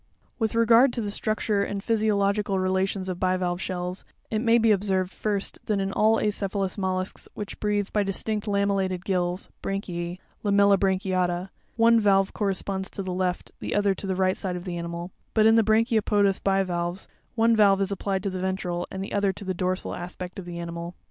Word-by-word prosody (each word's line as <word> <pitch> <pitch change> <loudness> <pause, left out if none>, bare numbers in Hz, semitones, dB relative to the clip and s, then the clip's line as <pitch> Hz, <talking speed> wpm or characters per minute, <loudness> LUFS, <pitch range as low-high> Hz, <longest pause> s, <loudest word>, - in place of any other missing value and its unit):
With 220 -1 0
regard 230 +3 +6
to 235 - -2
the 205 -2 -3
structure 215 -1 0
and 200 0 -4
physiological 205 -3 +1
relations 190 +1 0
of 180 -1 -4
bivalve 185 -1 0
shells, 180 0 -4 0.3
it 215 - +1
may 230 0 +4
be 225 -1 +4
observed, 190 -2 +1
first, 205 -1 -3
that 210 -2 +1
in 195 0 -2
all 220 +1 +4
acephalous 200 -2 -1
mollusks 185 -1 -3
which 205 -1 -6
breathe 205 -1 0
by 210 - +3
distinct 210 +2 -2
lamellated 195 -3 0
gills 180 -1 -1
(branchiz), 180 -3 -3 0.3
—Lamellibranchiata,—one 195 +2 +2
valve 195 -2 +3
corresponds 195 -1 -2
to 195 - -5
the 185 -1 -3
left, 180 -1 -2
the - - -3
other 205 -1 +3
to 195 - -7
the 190 - 0
right 185 0 +2
side 185 -2 -3
of 175 - -5
the 180 -1 -4
animal; 170 +1 -5 0.2
but 215 -1 +5
in 225 - +7
the 225 - +6
brachiopodous 215 -3 +2
bivalves, 185 -2 0 0.3
one 230 0 +4
valve 200 -2 +5
is 195 0 0
applied 195 -1 -2
to 200 - -1
the 185 - -4
ventral, 180 -2 -2
and 190 0 -5
the - - -7
other 200 -1 +2
to 200 - -10
the 185 - -1
dorsal 185 +1 -2
aspect 180 +1 -7
of 185 - -7
the 175 -1 -6
animal. 170 0 -6
195 Hz, 185 wpm, -26 LUFS, 185-205 Hz, 0.3 s, in